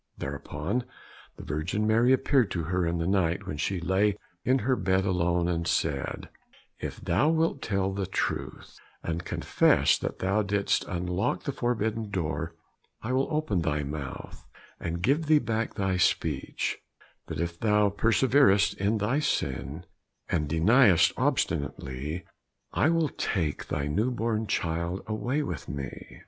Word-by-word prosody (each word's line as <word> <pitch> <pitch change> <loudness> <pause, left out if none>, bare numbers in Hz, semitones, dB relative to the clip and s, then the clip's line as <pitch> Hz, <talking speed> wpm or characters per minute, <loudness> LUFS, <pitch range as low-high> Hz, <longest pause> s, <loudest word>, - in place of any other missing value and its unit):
Thereupon 75 - -3 0.5
the - - -9
Virgin 80 +9 -2
Mary 115 +3 +4
appeared 130 -3 +3
to 85 - -2
her 90 +1 0
in 85 +1 0
the 85 - -1
night 95 +1 +1
when 85 -6 -4
she 95 +4 -1
lay 95 +4 +1 0.3
in 130 +1 +3
her 130 0 +3
bed 95 -4 +1
alone, 90 -2 +1
and 85 -1 -1
said, 70 -4 -1 0.5
"If - - -5
thou 150 +5 +2
wilt 160 -3 +1
tell 95 -2 0
the 95 -1 -2
truth 95 - -3 0.2
and 85 +1 -3
confess - - +3
that - - -4
thou 95 +3 +1
didst 100 -1 +1
unlock 90 +2 -1
the 140 - -2
forbidden 115 -4 -1
door, 80 -3 -3 0.5
I 120 +3 -2
will 135 +1 +2
open 150 - 0
thy 75 -2 0
mouth 70 -1 -6 0.4
and 85 +1 -4
give 145 - +2
thee 155 0 +6
back 115 -4 -1
thy 95 -2 0
speech, 90 - 0 0.5
but 80 - -5
if 85 0 -3
thou 105 -2 +3
perseverest 115 -2 +4
in 100 +3 +1
thy 110 +8 +1
sin, 75 - -2 0.4
and 75 -3 -1
deniest 95 - +5
obstinately, 70 +4 -2 0.5
I 150 - +3
will 165 -2 +2
take 80 -12 -2
thy 70 - -2
new 100 +12 +1
born 115 -2 -1
child 85 0 -1
away 120 +7 -1
with - - -5
me." 70 -2 -7
95 Hz, 150 wpm, -28 LUFS, 85-115 Hz, 0.5 s, thee